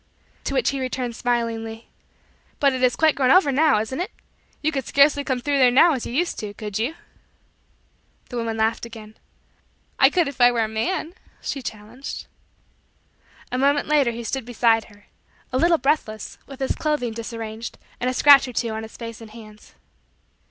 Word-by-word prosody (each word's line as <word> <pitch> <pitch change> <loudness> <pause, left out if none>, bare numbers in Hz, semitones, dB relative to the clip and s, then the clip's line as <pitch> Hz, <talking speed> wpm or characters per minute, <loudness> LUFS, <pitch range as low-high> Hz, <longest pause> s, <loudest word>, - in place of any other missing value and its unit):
To - - -2
which - - +2
he 275 - -3
returned 255 -2 -3
smilingly: 230 -1 -2 0.7
"But 280 -2 +3
it 260 - -3
is 250 -2 +3
quite 315 +3 +4
grown 260 -2 +1
over 310 -2 +5
now, 290 -3 +4
isn't 220 +7 -4
it? 365 - -3 0.5
You 310 - +2
could 270 -4 -3
scarcely 285 0 +4
come 260 -2 -1
through 280 +2 0
there 255 -2 +6
now 300 +7 +5
as 255 - -3
you - - -6
used 335 +7 -1
to 210 - -4
do 205 - -8
could 210 -1 -5
you?" 255 +9 -1 1.3
The 245 - -5
woman 230 -1 -2
laughed 220 +1 0
again. 220 -2 -10 0.8
"I - - +7
could 350 -4 +1
if 280 -2 -6
I 245 0 +7
were 235 -2 +1
a - - -1
man" 315 +10 -2 0.3
she 275 - -4
challenged. 225 +3 -7 1.3
A 250 - -1
moment 285 +1 +2
later 295 -4 +3
he 235 0 -5
stood 265 +3 -3
beside 230 -1 +2
her; 205 -2 -19 0.5
a 255 - +2
little 335 +2 +4
breathless, 270 -8 -2
with 275 -1 -11
his 265 - 0
clothing 295 -7 -1
disarranged, 225 0 -6 0.2
and 250 - 0
a - - -1
scratch 280 -1 +7
or 250 - -7
two 235 0 -1
on 220 0 -4
his 220 0 -10
face 230 -1 -8
and 225 - -10
hands. 215 -1 -14
245 Hz, 190 wpm, -23 LUFS, 225-280 Hz, 1.3 s, I